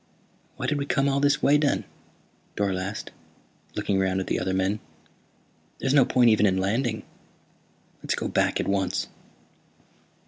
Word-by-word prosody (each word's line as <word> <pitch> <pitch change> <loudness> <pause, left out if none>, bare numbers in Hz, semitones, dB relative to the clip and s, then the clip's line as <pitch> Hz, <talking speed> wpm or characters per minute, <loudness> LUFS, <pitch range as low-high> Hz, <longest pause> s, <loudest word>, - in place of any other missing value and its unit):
"Why - - -4
did 145 -1 0
we 140 - -3
come 140 -1 +1
all 140 0 +1
this 145 0 +2
way, 145 +2 +5
then?" 145 -1 +1 0.7
Dorle 100 -2 0
asked, 100 +3 -5 0.6
looking 95 -1 0
around 95 0 +1
at 95 - -3
the - - -1
other 95 - -1
men. 95 +3 0 1.0
"There's 135 - 0
no 140 -3 +6
point 120 -2 +4
even 105 -1 +4
in 95 -1 +1
landing. 110 +4 -1 1.0
Let's - - -1
go - - -3
back - - +1
at - - -1
once." 95 -2 -1
105 Hz, 160 wpm, -25 LUFS, 95-135 Hz, 1.0 s, no